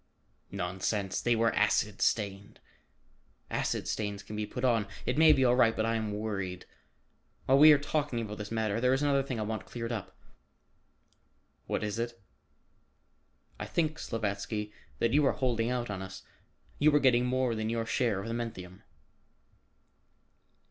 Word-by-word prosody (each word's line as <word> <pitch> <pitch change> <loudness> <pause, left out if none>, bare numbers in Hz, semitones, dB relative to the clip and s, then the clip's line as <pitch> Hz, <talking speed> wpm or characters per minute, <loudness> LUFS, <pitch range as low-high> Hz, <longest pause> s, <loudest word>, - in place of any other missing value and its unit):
"Nonsense, 95 +2 -2
they 120 -1 +2
were 115 0 +2
acid 105 -1 +1
stained." 100 -2 -1 0.9
"Acid - - -1
stains 105 -2 -3
can 105 - -8
be 105 0 -3
put 125 0 -3
on. 115 -5 +2 0.2
It 125 - 0
may 160 +1 +7
be 135 -3 +4
all 120 0 +4
right, 115 -3 +4
but 110 - 0
I 115 - +1
am 110 -2 -2
worried. 100 -4 -4 0.8
While 135 +1 +4
we 155 +1 +10
are 150 - +7
talking 145 -3 -2
about 105 -2 -5
this 105 0 -5
matter, 110 -1 -1
there 125 +1 +3
is 135 - -1
another 140 -1 +3
thing 130 -4 -4
I - - -1
want 110 +1 -4
cleared 115 0 -5
up." 110 -5 -6 1.5
"What - - -2
is 105 +1 -3
it?" 115 0 -4 1.4
"I - - -4
think, 160 -1 -1
Slavatsky, 105 -1 -3 0.3
that 115 - +1
you 150 +1 +4
are - - +2
holding 120 -3 0
out 120 -3 -2
on 95 -2 -4
us. 95 0 -8 0.6
You 155 +2 +5
are - - +6
getting 125 -2 +3
more 130 -1 +1
than 110 0 -2
your 115 0 -1
share 115 -3 0
of 100 - -7
the 115 - -3
menthium." 95 -6 -6
115 Hz, 170 wpm, -30 LUFS, 105-125 Hz, 1.5 s, we